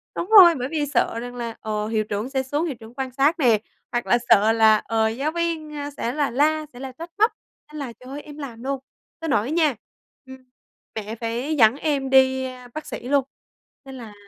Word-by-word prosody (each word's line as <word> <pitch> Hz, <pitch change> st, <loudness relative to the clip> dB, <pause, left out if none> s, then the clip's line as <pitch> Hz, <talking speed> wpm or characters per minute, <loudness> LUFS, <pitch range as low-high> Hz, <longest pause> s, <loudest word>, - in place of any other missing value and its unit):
đúng 360 Hz, -, -4 dB
rồi, 370 Hz, -6 st, +9 dB
bởi 255 Hz, 0 st, -3 dB
vì 300 Hz, -2 st, 0 dB
sợ 230 Hz, -1 st, +1 dB
rằng 245 Hz, +1 st, -7 dB
là, 235 Hz, -2 st, -5 dB
ờ, 210 Hz, -1 st, -2 dB
hiệu 220 Hz, -1 st, 0 dB
trưởng 210 Hz, +4 st, -4 dB
sẽ 265 Hz, -1 st, -1 dB
xuống, 290 Hz, +5 st, -1 dB
hiệu 295 Hz, -, -3 dB
trưởng 225 Hz, +1 st, -13 dB
quan 265 Hz, -1 st, -3 dB
sát 285 Hz, +6 st, +2 dB
nè, 230 Hz, -6 st, +4 dB, 0.3 s
hoặc 240 Hz, 0 st, -1 dB
là 240 Hz, -, +4 dB
sợ 220 Hz, 0 st, +6 dB
là, 220 Hz, -1 st, +5 dB
ờ, 220 Hz, 0 st, 0 dB
giáo 275 Hz, +7 st, -2 dB
viên 335 Hz, -2 st, -2 dB, 0.3 s
sẽ 235 Hz, -, -2 dB
là 290 Hz, -4 st, 0 dB
la, 305 Hz, +4 st, +2 dB
sẽ 245 Hz, -, -11 dB
là 265 Hz, -1 st, -6 dB
trách 330 Hz, +6 st, -10 dB
móc. 440 Hz, +2 st, +5 dB, 0.4 s
Nên 305 Hz, -, -6 dB
là 255 Hz, -4 st, -5 dB
trời 255 Hz, +1 st, -13 dB
ơi, 290 Hz, -, -6 dB
em 295 Hz, 0 st, -12 dB
làm 245 Hz, -5 st, -8 dB
luôn, 275 Hz, 0 st, -2 dB, 0.4 s
tới 325 Hz, -1 st, -4 dB
nỗi 245 Hz, +1 st, +1 dB
nha, 315 Hz, -5 st, +2 dB, 0.5 s
ừm, 260 Hz, 0 st, -11 dB, 0.6 s
mẹ 220 Hz, +1 st, -5 dB
phải 235 Hz, +7 st, -3 dB
dẫn 225 Hz, -2 st, +5 dB
em 280 Hz, -2 st, -1 dB
đi 265 Hz, 0 st, +4 dB, 0.3 s
bác 310 Hz, 0 st, -6 dB
sĩ 245 Hz, -3 st, -7 dB
luôn, 280 Hz, -2 st, +3 dB, 0.6 s
nên 265 Hz, 0 st, -9 dB
là, 225 Hz, -4 st, -10 dB
265 Hz, 220 wpm, -23 LUFS, 230-300 Hz, 0.6 s, rồi